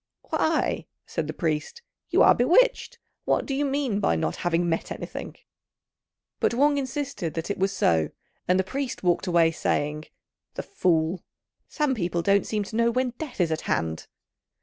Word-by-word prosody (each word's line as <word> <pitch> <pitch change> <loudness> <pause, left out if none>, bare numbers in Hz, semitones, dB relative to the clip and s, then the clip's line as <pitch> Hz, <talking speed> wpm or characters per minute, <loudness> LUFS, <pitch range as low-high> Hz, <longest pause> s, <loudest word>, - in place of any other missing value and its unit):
"Why," 315 0 0 0.2
said 165 -3 -3
the - - -2
priest, 155 - -3 0.3
"you - - +5
are - - +8
bewitched; 480 - +3 0.3
what - - +1
do 275 - -3
you 280 +2 0
mean 275 -6 0
by 140 - +2
not 80 0 -1
having 175 0 0
met 165 -1 -1
anything?" - - -6 1.0
But - - +1
Wang 285 +2 +3
insisted 270 - -4
that 165 +4 -3
it - - -4
was 195 +1 +2
so, 80 - +2 0.4
and 185 +1 +3
the - - +3
priest 265 +4 -4
walked 180 +1 +1
away, 170 -2 +4
saying, 150 -1 -1 0.5
"The - - -4
fool! 170 - 0 0.5
Some 300 -3 0
people 175 -6 -1
don't 200 +1 +3
seem 210 -1 -1
to 210 - -8
know 235 +1 +3
when 250 +1 0
death 295 -9 -7
is 170 -3 +2
at 160 - -1
hand." 80 -1 -1
190 Hz, 170 wpm, -26 LUFS, 165-265 Hz, 1.0 s, are